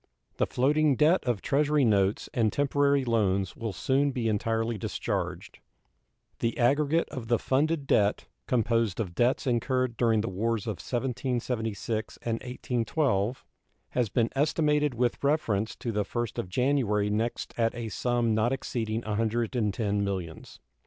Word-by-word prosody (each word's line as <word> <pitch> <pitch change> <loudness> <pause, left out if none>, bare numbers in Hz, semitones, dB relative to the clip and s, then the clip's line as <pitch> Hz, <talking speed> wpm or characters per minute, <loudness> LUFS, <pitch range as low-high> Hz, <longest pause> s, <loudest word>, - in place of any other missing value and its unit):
The - - +1
floating 145 +3 +2
debt 155 +7 +3
of 120 -5 -1
Treasury 145 0 +2
notes 100 -2 +2
and 110 -3 +2
temporary 140 -1 +2
loans 100 -5 +1
will 115 -2 -4
soon 135 +9 +1
be 125 -4 -2
entirely 115 +2 0
discharged. 105 - -4 0.8
The 115 0 -1
aggregate 145 +6 +2
of 120 -4 -6
the 120 0 +3
funded 145 +4 0
debt, 105 -6 +2 0.2
composed 115 -4 +1
of 95 -6 -3
debts 120 +9 +1
incurred 125 0 0
during 115 -3 +3
the 110 - -3
wars 110 +4 -1
of 110 -3 -3
1776 120 -4 -2
and 115 - -1
1812, 125 -2 -1 0.4
has 125 -4 0
been 115 +3 +1
estimated 150 -1 +2
with 120 +2 0
reference 115 -8 +1
to 120 - -4
the 105 -1 0
first 120 +2 -3
of 90 - -4
January 110 -4 +1
next 115 +3 -2
at 115 0 +1
a 115 -2 -4
sum 120 0 0
not 110 +3 +2
exceeding 115 -4 -2
$110 110 -1 0
millions. 95 -5 -5
120 Hz, 140 wpm, -28 LUFS, 110-130 Hz, 0.8 s, debt